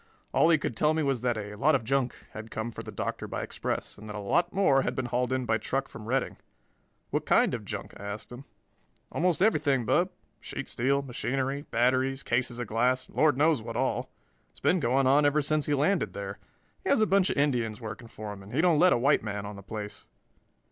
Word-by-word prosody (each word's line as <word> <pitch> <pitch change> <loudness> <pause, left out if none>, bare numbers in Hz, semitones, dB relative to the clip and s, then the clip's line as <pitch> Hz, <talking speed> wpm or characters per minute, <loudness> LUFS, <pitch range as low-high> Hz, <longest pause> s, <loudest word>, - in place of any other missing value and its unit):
All 160 - +5
he 165 - +6
could 130 -5 -3
tell 150 +6 +2
me 160 - +1
was 135 -4 0
that 120 -2 0
a 105 -1 -5
"lot 140 +8 +3
of 130 - 0
junk" 130 +1 0 0.2
had 110 +1 -8
come 110 +2 -4
for - - -7
the - - -8
Doctor - - -4
by - - -4
express - - -4
and 110 +1 -10
that 105 - -6
a - - -4
lot 170 - +1
more 175 -9 +4
had - - -2
been 130 - -2
hauled 125 +1 -1
in 130 -1 0
by 110 -1 +1
truck 135 0 -2
from 105 - -10
Redding. 135 +3 -1 0.7
"What - - 0
kind - - +4
of - - -4
junk?" - - -6
I 100 - -8
asked 105 +3 -6
him. 125 +3 -9 0.7
"Almost 180 +1 +1
everything, 140 - +2
Bub: 165 - +2 0.3
sheet - - -6
steel, 140 +3 +1
machinery, 135 +2 -2
batteries, 130 +3 +1
cases 120 0 0
of 120 - -3
glass, 125 +4 +1
and - - -18
Lord 145 +1 +4
knows 150 -3 +3
what 115 +1 -5
all. 130 +1 -1 0.4
It's - - -18
been 185 - +3
going 135 0 +2
on 140 +3 +5
ever 145 +1 +3
since 150 +1 0
he 145 - +2
landed 155 +7 +1
there. 100 0 -6 0.4
He - - -2
has - - +4
a 215 - +5
bunch 195 -2 +3
of - - -2
Indians 120 -7 +1
working 115 0 -7
for 110 -2 -7
him 100 - -11
and 100 +5 -9
he - - +1
don't 170 -4 +4
let 180 +2 +6
a - - +3
white 140 +5 +3
man 105 -1 -4
on 105 0 -6
the 100 - -9
place." 105 +1 -7
130 Hz, 235 wpm, -28 LUFS, 110-145 Hz, 0.7 s, he